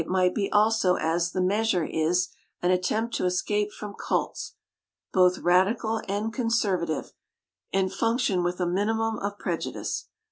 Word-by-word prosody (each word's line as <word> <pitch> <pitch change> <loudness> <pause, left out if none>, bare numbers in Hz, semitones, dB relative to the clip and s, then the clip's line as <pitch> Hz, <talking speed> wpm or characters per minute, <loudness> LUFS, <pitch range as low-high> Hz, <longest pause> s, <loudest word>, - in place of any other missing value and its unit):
It 160 - -6
might 180 -1 +2
be 200 -2 -1
also, 210 -3 +4
as 170 +1 0
The 185 - -1
Mbasurb 190 -2 +1
is, 170 +3 +1 0.3
an 180 - +2
at 180 0 +2
tempt 220 +5 -1
to - - -1
escape 205 +3 0
from 210 -1 -8
cults, - - -2 0.6
both 185 -1 +5
radical 215 +5 +2
and 210 +3 -2
conservative, 200 - 0 0.6
and 190 0 +1
function 225 -3 +1
with 175 +1 -1
a 180 - +1
minimum 220 +5 0
of 200 +1 -3
prejudice. - - -3
190 Hz, 150 wpm, -26 LUFS, 180-220 Hz, 0.6 s, both